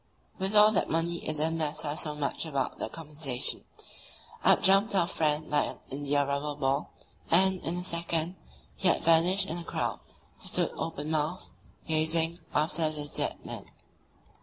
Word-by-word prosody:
With 190 +2 -2
all 210 +1 +7
that 210 - 0
money 170 +1 0
it 155 - -1
didn't 160 +2 0
matter 150 -1 -2
so 150 -1 -3
much 145 -2 -3
about 140 -5 -3
the - - -4
compensation; 150 -5 +2 0.8
up - - +4
jumped 195 +3 +4
our 185 - +3
friend 155 -3 -1
like 150 - +2
an - - -9
india 145 +1 0
rubber 140 +1 -3
ball, 140 0 -1 0.4
and 190 +2 +4
in 170 +2 -1
a 180 - -4
second 170 -1 -1 0.4
he 190 - 0
had 175 - +2
vanished 175 +4 +5
in 165 - -2
the 175 - -5
crowd, - - -3 0.4
who - - -11
stood - - +2
open 155 -2 -5
mouthed, 155 +3 -2 0.3
gazing 160 +1 +2
after 155 +1 +1
the 150 -1 -4
"dead" - - -2
man. - - -7
160 Hz, 165 wpm, -28 LUFS, 150-170 Hz, 0.8 s, all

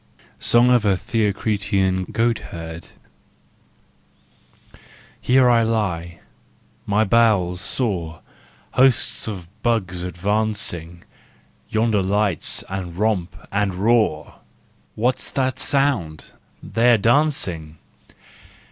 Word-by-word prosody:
SONG 120 +1 +4
OF 120 -3 +4
A 100 -2 +3
THEOCRITEAN 100 -3 0
GOATHERD. 85 -8 -3 2.3
Here 130 0 +4
I 120 -1 +4
lie, 90 -7 -2 0.7
my 105 +2 +2
bowels 100 -5 +2
sore, 90 - -2 0.5
Hosts 130 -3 +2
of 95 -6 -6
bugs 95 -7 -1
advancing, 90 -2 -2 0.7
Yonder 110 -2 +1
lights 100 -2 -1
and 90 -3 -6
romp 95 -5 0 0.2
and 100 -2 0
roar! 105 -5 +1 0.6
What's 125 +4 0
that 130 -1 -1
sound? 125 - -1 0.3
They're 120 +1 +3
dancing! 100 - 0
105 Hz, 85 wpm, -21 LUFS, 90-115 Hz, 2.3 s, SONG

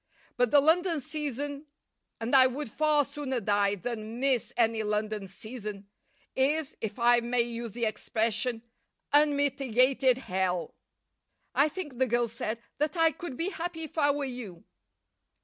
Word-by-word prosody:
But 245 -1 +2
the 290 +2 +6
London 330 +2 +3
season 290 0 -4 0.5
and 230 +4 0
I 260 -1 +8
would 260 -1 -5
far 305 0 +3
sooner 265 -3 -3
die 205 -1 +2
than 225 +2 -5
miss 265 -3 +1
any 225 -1 +2
London 210 -1 -2
season 210 0 -8 0.5
is, 285 +2 +1
if 210 -2 -4
I 240 0 +5
may 240 +1 +1
use 235 -2 -5
the 235 -1 -1
expression, 225 +2 -1 0.5
unmitigated 275 -3 +3
hell." 185 -7 -1 0.8
"I 290 +2 +4
think," 295 -7 -6
the 260 - +3
girl 240 0 +1
said, 225 0 -4 0.2
"that 300 +4 0
I 325 -1 +5
could 290 -3 -7
be 340 +3 0
happy 335 -3 -5
if 315 - -8
I 290 -3 +3
were 285 0 0
you." 235 -10 -7
250 Hz, 150 wpm, -29 LUFS, 225-290 Hz, 0.8 s, I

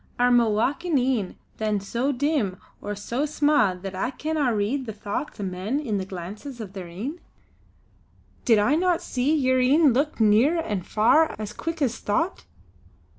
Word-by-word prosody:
Are 245 0 +3
ma 240 -1 +5
wakin' 285 +10 +1
een 245 -7 0 0.2
then 215 -2 0
so 235 +8 -1
dim 265 -8 0 0.2
or 205 0 -4
so 240 +8 -2
sma' 290 -9 +2
that 190 +1 -7
I 190 +6 -1
canna 300 -2 -1
read 230 +5 -1
the 220 - -4
thochts 205 +6 -5
o' - - -3
men 190 +8 -2
in 220 -9 -2
the 190 - -4
glances 200 +8 -8
o' 220 - -4
their 190 -2 -8
een. 230 - -6 1.2
Did 225 -3 +4
I 210 +7 +3
no 350 +2 +2
see 280 -2 0
yer 260 -3 +2
een 275 +2 +4
look 285 +3 0
near 225 +10 +4
an' 210 - -2
far 230 - +3
as 210 -1 -6
quick 330 -2 -3
as 240 -4 -1
thocht? 325 - -1
245 Hz, 175 wpm, -25 LUFS, 205-290 Hz, 1.2 s, ma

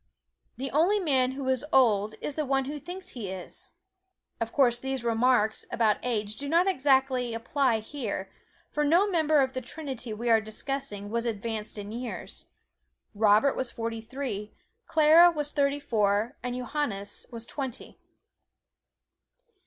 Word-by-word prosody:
The 270 +2 -4
only 350 +9 +3
man 265 -7 +2
who 270 0 -5
is 260 0 +1
old 215 -5 +3
is 295 - -3
the 305 - -1
one 270 -1 +1
who 295 +2 -5
thinks 370 +5 -8
he 230 - -6
is. 185 -1 -7 0.7
Of 230 0 -2
course 245 -4 +3
these 265 -1 -3
remarks 230 -1 +2
about 220 -3 +2
age 215 -3 -2
do 280 0 -4
not 340 +4 +4
exactly 265 -7 +2
apply 230 0 +1
just 215 - -17
here, 220 -9 -4 0.4
for 300 - 0
no 335 +7 +4
member 315 -6 +3
of 260 -1 0
the 255 - -3
trinity 260 -3 -6
we 225 +3 -4
are 225 -1 +5
discussing 220 -2 -5
was 235 +1 -1
advanced 220 -1 -4
in 205 0 -6
years. 240 +2 -7 0.7
Robert 215 +5 +4
was 260 - -2
forty 230 0 -4
three, 225 -4 -5 0.3
Clara 320 +3 +7
was 295 -3 -3
thirty 285 0 +1
four, 215 -5 +1
and 245 0 -3
Johannes 245 -6 -3
was 230 -2 -6
twenty. 265 -3 -6
255 Hz, 155 wpm, -28 LUFS, 220-285 Hz, 0.7 s, Clara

